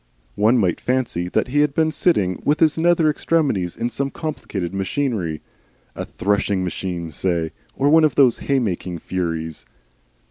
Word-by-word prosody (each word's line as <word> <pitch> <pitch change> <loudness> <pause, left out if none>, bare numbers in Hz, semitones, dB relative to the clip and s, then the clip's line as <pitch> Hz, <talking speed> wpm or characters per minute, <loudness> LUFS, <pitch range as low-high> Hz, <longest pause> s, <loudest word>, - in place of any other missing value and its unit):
One 110 +4 +3
might 95 -7 +1
fancy 120 -9 -1
that 125 - 0
he 145 +3 +1
had 150 -1 +2
been 160 -1 +2
sitting 105 - +1
with 150 +1 +2
his 155 -2 +4
nether 165 -1 +3
extremities 145 - 0
in 120 +1 -2
some 135 +4 -2
complicated 105 - -4
machinery, 95 - -2 0.5
a - - -4
threshing 100 -1 0
machine, 90 -2 -4
say, 85 0 -1 0.2
or 140 - +1
one 160 +2 +6
of 150 -6 +3
those 130 -5 +4
hay 140 - 0
making 90 -7 -2
furies. 80 -3 -4
110 Hz, 155 wpm, -21 LUFS, 90-145 Hz, 0.5 s, one